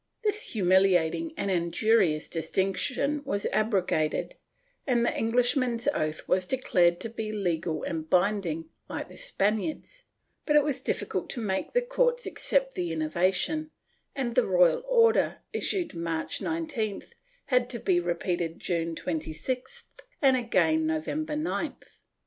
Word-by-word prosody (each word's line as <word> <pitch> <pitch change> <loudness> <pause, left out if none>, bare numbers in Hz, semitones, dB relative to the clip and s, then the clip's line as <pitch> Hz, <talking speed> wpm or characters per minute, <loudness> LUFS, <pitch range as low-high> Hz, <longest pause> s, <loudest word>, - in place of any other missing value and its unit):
This 425 0 0
humiliating 190 - +3
and 200 - -1
injurious 175 -1 +2
distinction 195 - -1
was 200 -8 -2
abro 215 -3 +2
gated, 155 - -1 0.5
and 240 -3 +2
the - - 0
Englishman's 245 +1 +1
oath 155 - -2
was 185 0 +1
declared 175 -9 +2
to - - -2
be 220 -1 -4
legal 170 -6 -2
and 160 -1 -4
binding, 180 -4 +1 0.2
like - - -5
the - - -13
Spaniard's, 320 - -2 0.4
but 300 - +3
it 295 - +6
was 280 -3 -1
difficult 260 - -2
to 250 - -3
make 190 -4 -2
the - - +3
courts - - +1
accept 270 -1 0
the 175 -2 -2
innovation, 185 - 0 0.5
and 255 -4 -2
the - - +3
royal 180 - +4
order, 460 -2 +3
issued 360 -4 -1
March 165 -1 -2
19th 280 -11 -3 0.4
had 250 -2 +2
to 245 - -2
be 185 -5 +2
repeated 175 -1 -2
June 165 -2 -2
26th 180 - -4 0.4
and 270 -2 +5
again 315 +6 +2
November 310 -1 -2
9th. 305 +3 -3
215 Hz, 135 wpm, -28 LUFS, 175-290 Hz, 0.5 s, it